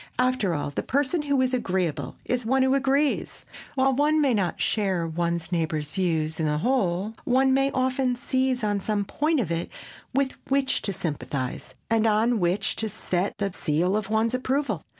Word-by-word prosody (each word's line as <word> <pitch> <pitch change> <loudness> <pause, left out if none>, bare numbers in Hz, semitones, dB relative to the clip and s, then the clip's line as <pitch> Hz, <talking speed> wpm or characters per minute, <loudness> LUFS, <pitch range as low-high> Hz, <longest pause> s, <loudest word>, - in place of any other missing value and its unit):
After 250 -8 +1
all, 145 -1 -3
the - - -2
person 285 +4 0
who 285 -2 +1
is 255 0 +1
"agreeable" 185 - -1
is 250 0 0
one 260 +4 +2
who 260 0 +3
agrees. 275 +2 0 0.3
While 265 0 +3
one 300 +3 +3
may 280 -4 +3
not 190 -6 0
share 190 -5 +1
one's 170 +1 -2
neighbor's 155 -3 -1
views 160 -4 -1
in 160 - +1
the 150 0 +1
whole, 200 - 0
one 265 +1 +3
may 270 +1 +3
often 255 -1 0
seize 260 -1 0
on 205 -1 +1
some 205 0 -1
point 305 +7 0
of 190 -9 -1
it 165 0 -2 0.4
with 270 0 +1 0.2
which 270 0 +1
to - - +1
sympathize 140 -7 -4
and 225 0 +2
on 220 +2 +2
which 175 +2 +1
to 220 - -1
set 185 -2 -2
the 200 -2 -2
seal 175 +5 0
of 210 -1 -2
one's 220 +2 +1
approval. 255 - -1
220 Hz, 180 wpm, -25 LUFS, 175-265 Hz, 0.4 s, who